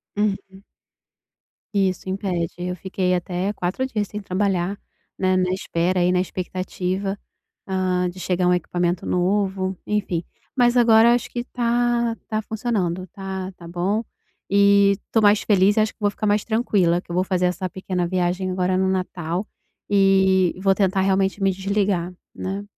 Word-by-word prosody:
Uhum. 195 Hz, -2 st, -2 dB, 1.1 s
Isso, 190 Hz, -2 st, 0 dB
impede, 185 Hz, -3 st, -1 dB
eu 180 Hz, +1 st, -3 dB
fiquei 185 Hz, 0 st, -1 dB
até 180 Hz, +2 st, -1 dB
4 185 Hz, +7 st, -2 dB
dias 215 Hz, -6 st, -2 dB
sem 210 Hz, +1 st, -6 dB
trabalhar, 195 Hz, 0 st, -1 dB, 0.4 s
né, 185 Hz, 0 st, +2 dB
na 185 Hz, 0 st, +1 dB
espera 185 Hz, -1 st, 0 dB
aí, 175 Hz, 0 st, +3 dB
na 180 Hz, -, +2 dB
expectativa, 185 Hz, +1 st, -3 dB, 0.5 s
hã, 185 Hz, -1 st, 0 dB
de 180 Hz, +1 st, -10 dB
chegar 180 Hz, 0 st, 0 dB
um 180 Hz, -, +4 dB
equipamento 175 Hz, 0 st, -1 dB
novo, 190 Hz, 0 st, 0 dB
enfim, 195 Hz, -5 st, -1 dB, 0.3 s
mas 245 Hz, -1 st, +3 dB
agora 230 Hz, 0 st, +6 dB
acho 240 Hz, -, -1 dB
que 240 Hz, -, -4 dB
tá 240 Hz, -1 st, 0 dB
tá 215 Hz, 0 st, -1 dB
funcionando, 205 Hz, -5 st, -2 dB
tá 190 Hz, 0 st, -6 dB
tá 170 Hz, -2 st, -13 dB
bom 185 Hz, +6 st, -1 dB, 0.5 s
e 200 Hz, 0 st, +5 dB, 0.2 s
tô 225 Hz, -, +3 dB
mais 205 Hz, 0 st, +5 dB
feliz, 200 Hz, 0 st, +3 dB
acho 215 Hz, -1 st, +3 dB
que -, -, -38 dB
vou 205 Hz, -1 st, +2 dB
ficar 210 Hz, +1 st, -5 dB
mais 205 Hz, 0 st, +2 dB
tranquila, 200 Hz, -7 st, +2 dB
que 175 Hz, -, -13 dB
eu -, -, -3 dB
vou 180 Hz, -, +2 dB
fazer 185 Hz, -1 st, +1 dB
essa 180 Hz, +1 st, -2 dB
pequena 185 Hz, -1 st, -3 dB
viagem 180 Hz, +1 st, -1 dB
agora 185 Hz, 0 st, 0 dB
no 190 Hz, 0 st, +2 dB
Natal, 180 Hz, -1 st, -2 dB, 0.4 s
e 190 Hz, -2 st, +4 dB
vou 195 Hz, 0 st, +4 dB
tentar 190 Hz, -1 st, +1 dB
realmente 195 Hz, +1 st, +1 dB
me 195 Hz, -, +4 dB
desligar, 190 Hz, -2 st, -1 dB, 0.2 s
né. 195 Hz, +2 st, -4 dB
190 Hz, 160 wpm, -22 LUFS, 180-205 Hz, 1.1 s, agora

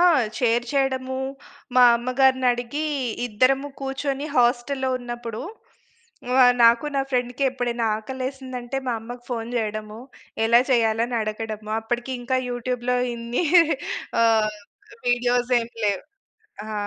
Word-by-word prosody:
ఆ! -, -, +5 dB, 0.4 s
షేర్ 240 Hz, -1 st, +2 dB
చేయడమూ, 260 Hz, -1 st, 0 dB, 0.6 s
మా 250 Hz, -, +8 dB
అమ్మగారినడిగి 255 Hz, +2 st, +1 dB, 0.4 s
ఇద్దరము 255 Hz, +5 st, +2 dB
కూర్చొని 275 Hz, +1 st, -3 dB
హాస్టల్‌లో 245 Hz, +2 st, +2 dB
ఉన్నప్పుడు 240 Hz, -2 st, -6 dB, 1.0 s
ఆహ్, 245 Hz, -1 st, +7 dB
నాకు 235 Hz, +4 st, +5 dB
నా -, -, +3 dB
ఫ్రెండ్‌కి 250 Hz, +1 st, -1 dB
ఎప్పుడైనా 240 Hz, -2 st, -2 dB
ఆకలేసిందంటే 260 Hz, +1 st, -5 dB
మా 250 Hz, -, +1 dB
అమ్మకి 245 Hz, +2 st, -9 dB
ఫోన్ 230 Hz, -2 st, -3 dB
చేయడము, 215 Hz, -1 st, -3 dB, 0.5 s
ఎలా 235 Hz, +2 st, +6 dB
చేయాలి 225 Hz, -2 st, +3 dB
అని 245 Hz, -, -5 dB
అడగడము. 215 Hz, 0 st, -4 dB
అప్పటికి 240 Hz, +3 st, -3 dB
ఇంకా 255 Hz, +2 st, -1 dB
యూట్యూబ్‌లో 245 Hz, 0 st, -2 dB, 0.2 s
ఇన్ని 235 Hz, +5 st, -2 dB, 0.8 s
ఆహ్, 220 Hz, -2 st, +3 dB, 0.6 s
వీడియోస్ 245 Hz, 0 st, +1 dB
ఏం 230 Hz, -, -4 dB, 0.2 s
లేవు. 200 Hz, -2 st, 0 dB, 0.6 s
ఆ! 220 Hz, -, -7 dB
245 Hz, 115 wpm, -23 LUFS, 230-260 Hz, 1.0 s, మా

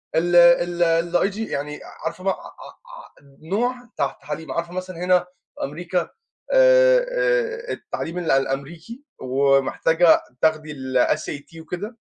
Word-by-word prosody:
ال 175 Hz, +2 st, +1 dB
ال 175 Hz, -1 st, +4 dB
الIG 195 Hz, +4 st, +1 dB
يعني 150 Hz, -9 st, -4 dB
ع -, -, -13 dB
عارفة 185 Hz, -, -4 dB
ب -, -, -5 dB
ع 195 Hz, -, +4 dB
ع -, -, -12 dB, 1.1 s
نوع 245 Hz, +3 st, -1 dB
تع 140 Hz, -, 0 dB
تعليم، 150 Hz, 0 st, -6 dB
عارفة 170 Hz, +4 st, -3 dB
مثلًا 185 Hz, -1 st, -6 dB
هنا 180 Hz, 0 st, +5 dB, 0.4 s
في -, -, -6 dB
أمريكا، 175 Hz, +5 st, -2 dB, 0.5 s
آآ -, -, +6 dB, 0.7 s
آآ -, -, 0 dB
التعليم 165 Hz, +2 st, -6 dB
ال 175 Hz, -2 st, -1 dB
الأمريكي، 150 Hz, -, -2 dB, 0.2 s
ومحتاجة 140 Hz, +5 st, +3 dB, 0.2 s
تاخدي 155 Hz, -1 st, +1 dB
الSAT 135 Hz, +4 st, -2 dB
وكده؟ 180 Hz, +7 st, -6 dB
170 Hz, 130 wpm, -22 LUFS, 150-185 Hz, 1.1 s, آآ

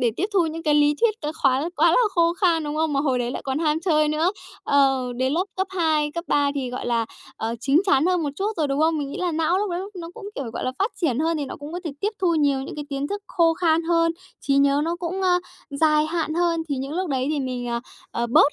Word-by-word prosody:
để 240 Hz, -2 st, +3 dB
tiếp 385 Hz, -, 0 dB
thu 360 Hz, -4 st, +3 dB
những 325 Hz, +1 st, -5 dB
cái 300 Hz, -2 st, +2 dB
lý 295 Hz, 0 st, +4 dB
thuyết 460 Hz, -2 st, +3 dB
cái 300 Hz, +1 st, -2 dB
khóa 275 Hz, +4 st, +3 dB
quá -, -, +5 dB
là -, -, +3 dB, 0.2 s
khô 335 Hz, -1 st, +3 dB
khan, 345 Hz, -4 st, +2 dB
đúng 295 Hz, 0 st, -3 dB
không? 315 Hz, -1 st, +1 dB
Mà 275 Hz, -, +1 dB
hồi 265 Hz, -4 st, +1 dB
đấy 240 Hz, 0 st, -1 dB
lại -, -, -5 dB
còn 270 Hz, +1 st, -1 dB
ham 310 Hz, -1 st, +1 dB
chơi 305 Hz, -4 st, +2 dB
nữa. 315 Hz, +4 st, +2 dB, 0.3 s
Ờ, 270 Hz, -3 st, +2 dB
đến 260 Hz, +2 st, 0 dB
lớp 355 Hz, +4 st, +1 dB
cấp 380 Hz, -, 0 dB
2, 315 Hz, -5 st, +1 dB
cấp 335 Hz, +1 st, -4 dB
3 285 Hz, -1 st, +3 dB
thì, 260 Hz, -3 st, -3 dB
gọi 250 Hz, -, -5 dB
là, 230 Hz, -2 st, +1 dB, 0.3 s
ờ, 225 Hz, +1 st, -2 dB
chín 275 Hz, +5 st, +3 dB
chắn 280 Hz, 0 st, +4 dB
hơn 360 Hz, -2 st, +2 dB
một 295 Hz, -, -1 dB
chút 395 Hz, -, -1 dB
rồi, 305 Hz, -3 st, 0 dB
đúng 275 Hz, +2 st, 0 dB
không? 315 Hz, 0 st, +2 dB
Mình 280 Hz, -1 st, -3 dB
nghĩ -, -, -6 dB
là 355 Hz, -2 st, -1 dB
não 325 Hz, +4 st, +1 dB
lúc 410 Hz, -2 st, -1 dB
đấy 345 Hz, -, -2 dB
nó 385 Hz, -, -5 dB
nó 335 Hz, -, -7 dB
cũng, 415 Hz, -3 st, -8 dB
kiểu, 275 Hz, -, -4 dB
gọi -, -, -5 dB
là, 255 Hz, -, -1 dB
phát 405 Hz, +4 st, +1 dB
triển 285 Hz, -8 st, +1 dB
hơn 325 Hz, +1 st, +1 dB
thì 290 Hz, -, -2 dB
nó -, -, -7 dB
cũng 290 Hz, +3 st, -9 dB
có 355 Hz, -, -4 dB
thể 320 Hz, -, -3 dB
tiếp 410 Hz, -, +1 dB
thu 350 Hz, -3 st, +2 dB
nhiều 285 Hz, -3 st, +2 dB
những 270 Hz, -, -6 dB
cái 295 Hz, -, -4 dB
kiến 275 Hz, +1 st, -2 dB
thức 410 Hz, 0 st, -4 dB
khô 330 Hz, -1 st, +2 dB
khan 330 Hz, -1 st, +2 dB
hơn, 330 Hz, 0 st, +2 dB, 0.3 s
trí 275 Hz, -1 st, +1 dB
nhớ 280 Hz, 0 st, +4 dB
nó 340 Hz, +1 st, -1 dB
cũng, 360 Hz, +2 st, -3 dB
a, 360 Hz, -1 st, +4 dB, 0.3 s
dài 305 Hz, +1 st, +3 dB
hạn 320 Hz, -1 st, -2 dB
hơn, 340 Hz, -1 st, +1 dB
thì 280 Hz, -, -1 dB
những 270 Hz, +2 st, -4 dB
lúc 365 Hz, +1 st, -2 dB
đấy 260 Hz, -2 st, 0 dB
thì 305 Hz, -2 st, 0 dB
mình, 250 Hz, -2 st, -3 dB
à, 235 Hz, 0 st, -1 dB, 0.3 s
à, 235 Hz, -, -1 dB
bớt 280 Hz, +5 st, +5 dB
305 Hz, 290 wpm, -23 LUFS, 275-340 Hz, 0.3 s, quá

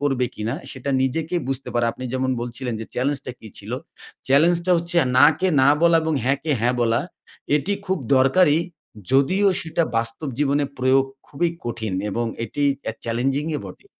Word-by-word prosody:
করবে 135 Hz, -3 st, +1 dB
কিনা, 110 Hz, +4 st, -3 dB, 0.2 s
সেটা 135 Hz, +1 st, -4 dB
নিজেকেই 165 Hz, +6 st, -1 dB
বুঝতে 135 Hz, -1 st, -3 dB
পারা। 120 Hz, 0 st, +2 dB
আপনি 130 Hz, -, -8 dB
যেমন 130 Hz, 0 st, 0 dB
বলছিলেন 120 Hz, 0 st, -4 dB
যে 110 Hz, -, -6 dB
চ্যালেঞ্জটা 135 Hz, 0 st, -1 dB
কি 110 Hz, -, -10 dB
ছিল? 105 Hz, +3 st, -7 dB, 0.6 s
চ্যালেঞ্জটা 170 Hz, +6 st, +3 dB
হচ্ছে, 170 Hz, +1 st, -1 dB, 0.2 s
"না 145 Hz, -, +9 dB
কে 190 Hz, -, +2 dB
না 135 Hz, -, +6 dB
বলা 170 Hz, -1 st, +6 dB
এবং 160 Hz, 0 st, 0 dB
হ্যাঁ 135 Hz, +2 st, +2 dB
কে 160 Hz, -, -1 dB
হ্যাঁ 125 Hz, +2 st, +2 dB
বলা।" 115 Hz, 0 st, +2 dB, 0.6 s
এটি 175 Hz, +8 st, -1 dB
খুব 190 Hz, -1 st, 0 dB, 0.2 s
দরকারি। 145 Hz, +4 st, +4 dB, 0.6 s
যদিও 185 Hz, +10 st, +3 dB
সেটা 165 Hz, +1 st, -1 dB
বাস্তব 115 Hz, +6 st, -2 dB
জীবনে 145 Hz, 0 st, +2 dB
প্রয়োগ 130 Hz, +1 st, +4 dB, 0.2 s
খুবই 170 Hz, +5 st, -1 dB, 0.2 s
কঠিন 110 Hz, -4 st, -3 dB, 0.2 s
এবং 115 Hz, +4 st, -1 dB, 0.2 s
এটি 145 Hz, +6 st, -2 dB, 0.2 s
অ্যা 110 Hz, -, -2 dB
challenging 135 Hz, +6 st, -1 dB
ই -, -, -3 dB
বটে। -, -, -11 dB
135 Hz, 170 wpm, -22 LUFS, 120-160 Hz, 0.6 s, না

